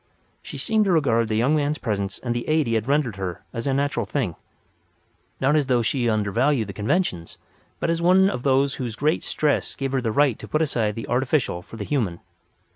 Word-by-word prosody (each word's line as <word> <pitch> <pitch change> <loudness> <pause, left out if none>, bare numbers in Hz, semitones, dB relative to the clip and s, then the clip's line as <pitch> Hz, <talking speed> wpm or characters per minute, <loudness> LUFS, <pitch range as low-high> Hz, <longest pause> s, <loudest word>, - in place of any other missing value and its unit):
She - - -8
seemed 220 -2 +1
to 195 - +2
regard 115 -9 +2
the 110 - -1
young 125 +8 +2
man's 150 0 0
presence 100 -6 -3
and 120 -2 -3
the 120 0 -4
aid 155 -1 +2
he 115 - -1
had 110 +1 0
rendered 135 -7 +1
her 95 -3 -5
as 115 +4 -3
a 135 - +1
natural 140 -6 0
thing—not 135 - -5
as 150 -3 +2
though 125 -3 +2
she 120 0 0
undervalued 115 +4 +1
the 100 - -7
conventions; 105 - -1 0.4
but - - 0
as 165 0 -1
one 185 +2 +5
whose 130 - 0
great 150 +5 +1
stress 150 -2 -1
gave 135 -1 -3
her 135 -1 0
the 115 -2 -1
right 140 0 +2
to - - -9
put 155 +1 +1
aside 110 -8 0
the 115 - -6
artificial 125 - 0
for 115 - -12
the 105 - -4
human. 105 - -1
130 Hz, 200 wpm, -23 LUFS, 110-145 Hz, 0.4 s, one